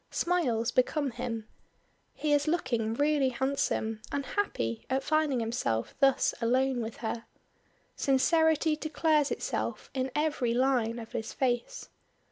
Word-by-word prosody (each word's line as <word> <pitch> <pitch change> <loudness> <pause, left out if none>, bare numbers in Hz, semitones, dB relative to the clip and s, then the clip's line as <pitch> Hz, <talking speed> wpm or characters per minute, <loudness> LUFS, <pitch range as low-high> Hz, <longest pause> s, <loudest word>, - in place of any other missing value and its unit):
Smiles 255 -11 0
become 275 +2 +1
him. 230 -3 -4 0.7
He 300 -1 0
is 290 +1 +2
looking 240 -9 0
really 290 -1 +2
handsome 245 -4 -1
and 280 -1 -2
happy 115 - -2
at 265 +1 0
finding 305 -4 +1
himself 225 - -1
thus 275 -2 +4
alone 255 +2 +2
with 225 0 -5
her. 230 +1 -3 0.7
Sincerity 315 +3 +3
declares 305 -1 +1
itself - - -3
in 260 0 -1
every 295 -6 +1
line 245 -3 +2
of 225 -1 -8
his 225 0 -4
face. 255 - -1
265 Hz, 125 wpm, -29 LUFS, 230-300 Hz, 0.7 s, thus